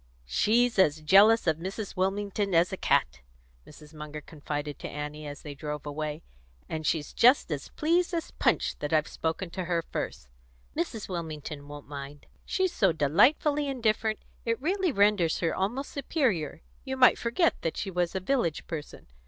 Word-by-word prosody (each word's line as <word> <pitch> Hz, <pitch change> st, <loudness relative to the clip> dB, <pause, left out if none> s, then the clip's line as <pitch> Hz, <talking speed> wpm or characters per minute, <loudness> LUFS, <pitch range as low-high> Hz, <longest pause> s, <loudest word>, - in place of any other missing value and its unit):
"She's 225 Hz, -, +2 dB
as 155 Hz, -4 st, +3 dB
jealous 205 Hz, +8 st, +6 dB
of 160 Hz, -3 st, +2 dB
Mrs. 195 Hz, +4 st, -5 dB
Wilmington 195 Hz, 0 st, -1 dB
as 170 Hz, +3 st, +3 dB
a -, -, -2 dB
cat," -, -, +1 dB, 0.5 s
Mrs. 150 Hz, +1 st, -14 dB
Munger 150 Hz, 0 st, -7 dB
confided 145 Hz, -1 st, -5 dB
to -, -, -6 dB
Annie 150 Hz, +1 st, -6 dB
as 145 Hz, 0 st, -8 dB
they 150 Hz, -, -6 dB
drove 150 Hz, +1 st, -6 dB
away; 150 Hz, +1 st, -4 dB, 0.4 s
"and 160 Hz, -1 st, -3 dB
she's 155 Hz, -3 st, -1 dB
just 250 Hz, -, +5 dB
as 145 Hz, -2 st, -3 dB
pleased 340 Hz, +4 st, +1 dB
as 335 Hz, -2 st, -3 dB
Punch -, -, 0 dB
that 145 Hz, +1 st, -3 dB
I've 155 Hz, -1 st, +3 dB
spoken 165 Hz, +2 st, -3 dB
to 185 Hz, 0 st, -4 dB
her 170 Hz, -1 st, 0 dB
first. 80 Hz, -, -5 dB, 0.5 s
Mrs. 210 Hz, +4 st, -3 dB
Wilmington 155 Hz, -4 st, -6 dB
won't 145 Hz, 0 st, -10 dB
mind. 140 Hz, 0 st, -8 dB, 0.2 s
She's 375 Hz, -2 st, 0 dB
so 190 Hz, -3 st, +3 dB
delightfully 280 Hz, -, +3 dB
indifferent, 220 Hz, -4 st, 0 dB, 0.2 s
it 230 Hz, 0 st, -1 dB
really 365 Hz, +4 st, 0 dB
renders 200 Hz, -, +3 dB
her 165 Hz, -, 0 dB
almost 240 Hz, +9 st, -2 dB
superior; 235 Hz, -, -1 dB, 0.2 s
you 265 Hz, -1 st, -4 dB
might 255 Hz, -1 st, +6 dB
forget 240 Hz, +9 st, +1 dB
that 165 Hz, -, -2 dB
she 195 Hz, -, -3 dB
was 180 Hz, 0 st, -1 dB
a -, -, +1 dB
village 185 Hz, -, 0 dB
person. 155 Hz, -3 st, -7 dB
175 Hz, 170 wpm, -28 LUFS, 150-230 Hz, 0.5 s, jealous